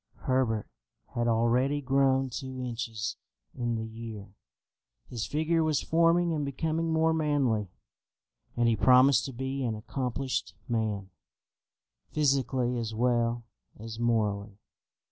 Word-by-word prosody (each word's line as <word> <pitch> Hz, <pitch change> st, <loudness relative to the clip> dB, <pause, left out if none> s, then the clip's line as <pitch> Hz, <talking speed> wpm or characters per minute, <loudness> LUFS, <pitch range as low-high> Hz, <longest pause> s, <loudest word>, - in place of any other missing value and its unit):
Herbert 125 Hz, -5 st, +1 dB, 0.5 s
had 120 Hz, 0 st, 0 dB
already 120 Hz, +5 st, +2 dB
grown 135 Hz, -1 st, +2 dB
two 130 Hz, +1 st, -5 dB
inches 115 Hz, -3 st, -4 dB, 0.4 s
in 120 Hz, -1 st, -2 dB
the 110 Hz, 0 st, -3 dB
year. 110 Hz, -3 st, -8 dB, 0.8 s
His 120 Hz, -3 st, -3 dB
figure 160 Hz, +2 st, +1 dB
was 155 Hz, -3 st, +1 dB
forming 170 Hz, +1 st, +3 dB
and 150 Hz, -2 st, -1 dB
becoming 160 Hz, +4 st, -1 dB
more 160 Hz, 0 st, +3 dB
manly, 140 Hz, -9 st, +1 dB, 0.9 s
and 120 Hz, 0 st, +3 dB
he 115 Hz, -, +3 dB
promised 130 Hz, +4 st, +5 dB
to 135 Hz, -, -5 dB
be 135 Hz, +2 st, -3 dB
an 115 Hz, -3 st, -1 dB
accomplished 130 Hz, +3 st, -3 dB
man, 110 Hz, -5 st, -2 dB, 1.0 s
physically 130 Hz, -4 st, +1 dB
as 110 Hz, -1 st, -4 dB
well 120 Hz, 0 st, +1 dB, 0.3 s
as 110 Hz, +1 st, -8 dB
morally. 105 Hz, -4 st, 0 dB
125 Hz, 120 wpm, -29 LUFS, 115-140 Hz, 1.0 s, promised